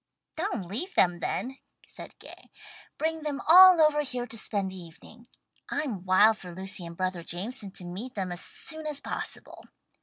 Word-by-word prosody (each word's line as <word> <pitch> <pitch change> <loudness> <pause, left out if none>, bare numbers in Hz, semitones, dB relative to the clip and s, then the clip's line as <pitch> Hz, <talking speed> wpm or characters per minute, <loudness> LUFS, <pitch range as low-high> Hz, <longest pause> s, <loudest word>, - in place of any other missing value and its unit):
"Don't 320 - -2
leave 250 - -5
them 175 -1 +3
then," 265 +9 -3 0.3
said - - -11
Gay. - - -14 0.5
"Bring 320 0 -1
them 295 -2 -3
all 365 +1 +9
over 305 -1 +4
here 250 -4 -3
to 230 - -11
spend 200 -3 -2
the - - -9
evening. 185 +7 -14 0.4
I'm 245 -11 -3
wild 210 +4 +5
for 180 -2 -10
Lucy 185 -1 -3
and 170 0 -10
brother 185 -2 -2
Jameson 200 +6 -6
to 180 - -7
meet 200 +9 -7
them 190 -3 -3
as 175 - -2
soon 330 -9 -1
as 295 -2 0
possible. - - -6
220 Hz, 175 wpm, -28 LUFS, 185-300 Hz, 0.5 s, all